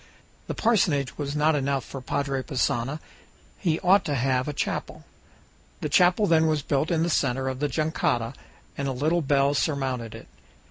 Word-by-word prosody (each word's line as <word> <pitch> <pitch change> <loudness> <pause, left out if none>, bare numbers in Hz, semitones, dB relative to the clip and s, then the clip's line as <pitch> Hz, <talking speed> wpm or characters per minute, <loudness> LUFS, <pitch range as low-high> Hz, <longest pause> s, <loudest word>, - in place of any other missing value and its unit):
The - - -4
parsonage 170 - +1
was 145 0 -3
not 150 +1 +3
enough 140 -1 -1
for 135 - -8
Padre 135 +1 -2
Passanha; 130 +1 -1 0.6
he 165 -4 0
ought 190 +2 +5
to 145 - -1
have 130 0 0
a - - -1
chapel. 145 - -4 0.8
The 150 - -2
chapel 180 +6 +4
then 160 -3 +4
was 155 -2 0
built 145 +3 0
in 165 -2 +1
the - - +1
center 135 -2 0
of 130 -1 -3
the 145 0 0
jangada, 135 -6 -1 0.4
and 140 - -3
a 135 - -1
little 155 +7 +1
bell 140 -1 +2
surmounted 130 -6 -2
it. - - -11
140 Hz, 175 wpm, -25 LUFS, 135-160 Hz, 0.8 s, ought